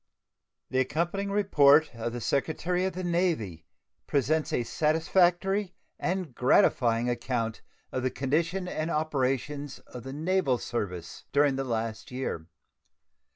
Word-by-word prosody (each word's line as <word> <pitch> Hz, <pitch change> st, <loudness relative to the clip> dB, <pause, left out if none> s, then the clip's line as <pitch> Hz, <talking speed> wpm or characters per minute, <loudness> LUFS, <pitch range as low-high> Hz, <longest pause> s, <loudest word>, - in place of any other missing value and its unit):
The 130 Hz, -, +2 dB
accompanying 170 Hz, +9 st, -1 dB
report 155 Hz, -8 st, +5 dB
of 115 Hz, 0 st, -4 dB
the 120 Hz, 0 st, -5 dB
Secretary 165 Hz, -, 0 dB
of 190 Hz, -, -1 dB
the 185 Hz, +2 st, -5 dB
Navy 170 Hz, -, -1 dB, 0.4 s
presents 150 Hz, +3 st, +1 dB
a 120 Hz, -, +1 dB
satisfactory 175 Hz, -, +2 dB, 0.2 s
and 180 Hz, -6 st, -2 dB
gratifying 120 Hz, -1 st, +3 dB
account 120 Hz, -2 st, -2 dB, 0.3 s
of 130 Hz, -, -2 dB
the 130 Hz, -, +1 dB
condition 165 Hz, +8 st, -1 dB
and 155 Hz, -1 st, -2 dB
operations 145 Hz, -2 st, -1 dB
of 125 Hz, -, -11 dB
the 135 Hz, +3 st, -7 dB
naval 155 Hz, -2 st, +1 dB
service 90 Hz, -9 st, -5 dB
during 140 Hz, -1 st, +3 dB
the 135 Hz, 0 st, -2 dB
past 115 Hz, -1 st, -3 dB
year. 125 Hz, -11 st, -4 dB
140 Hz, 125 wpm, -28 LUFS, 120-175 Hz, 0.4 s, report